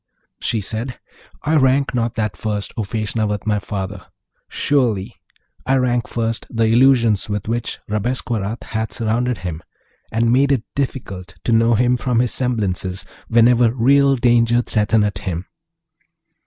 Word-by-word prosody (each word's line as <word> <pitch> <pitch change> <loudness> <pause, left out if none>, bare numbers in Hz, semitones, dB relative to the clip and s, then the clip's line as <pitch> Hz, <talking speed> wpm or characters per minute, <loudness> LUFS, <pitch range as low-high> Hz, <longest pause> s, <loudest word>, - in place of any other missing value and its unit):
She 115 - -1
said, 115 +5 -3 0.4
'I 155 +2 +2
rank 135 0 +3
not 120 -1 -1
that 105 -5 -2
first, 105 +2 -3
O - - -2
Feshnavat, 105 0 -2
my 105 -1 +1
father; 100 -1 -5 0.4
surely 120 -9 0 0.5
I 135 - +1
rank 120 -2 +1
first 115 -1 -2
the 115 -1 0
illusions 115 -3 +4
with 105 -1 -3
which 115 +1 -2
Rabesqurat 110 0 -2
hath 110 0 -3
surrounded 120 +2 0
him, 85 -2 -4 0.5
and 115 +1 +2
made 140 +2 +3
it 130 -5 +1
difficult 100 -10 -4
to - - 0
know 115 +1 +4
him 125 +2 +2
from 125 -1 -1
his 125 -1 +2
semblances, 100 -7 -1 0.2
whenever 115 0 +4
real 140 +3 +4
danger 120 -1 +3
threateneth 105 -1 +1
him.' 90 -2 -4
115 Hz, 140 wpm, -20 LUFS, 105-125 Hz, 0.5 s, illusions